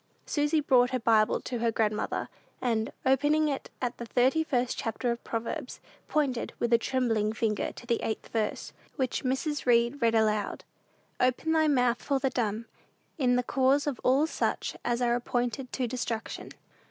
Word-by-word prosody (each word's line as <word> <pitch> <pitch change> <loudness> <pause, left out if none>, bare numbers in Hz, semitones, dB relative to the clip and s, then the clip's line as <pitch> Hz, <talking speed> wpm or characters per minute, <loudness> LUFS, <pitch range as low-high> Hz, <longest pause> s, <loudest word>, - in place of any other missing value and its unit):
Susy 295 +1 +1
brought 250 -4 +4
her 255 - 0
Bible 220 -2 +3
to 245 - -4
her 230 0 +1
grandmother, 215 -1 -1 0.3
and, 225 -3 0
opening 290 +4 +3
it 280 -2 -3
at 245 -1 -2
the 235 - -5
thirty 260 +7 +3
first 250 -5 0
chapter 235 +2 -2
of 235 - -4
Proverbs, 240 +5 -4 0.3
pointed, 275 -6 0
with 235 0 0
a 230 - +6
trembling 230 -4 0
finger, 220 -2 -1
to - - -11
the 235 -1 0
eighth 220 - -3
verse, 220 -2 -2 0.2
which 260 -4 -1
Mrs. 270 +2 -1
Read 235 +3 +3
read 230 -1 +3
aloud, 215 -2 +1 0.6
"Open 255 +6 +1
thy 315 -1 +3
mouth 250 -4 +2
for 280 - 0
the 265 0 0
dumb 225 -1 -1 0.5
in 250 -3 +3
the 250 - +2
cause 270 +3 +2
of 285 -4 -3
all 270 +4 +4
such 320 - -2
as 240 +1 0
are 240 -1 +3
appointed 245 +1 -2
to 260 - 0
destruction." 230 -2 -4
245 Hz, 170 wpm, -29 LUFS, 230-270 Hz, 0.6 s, a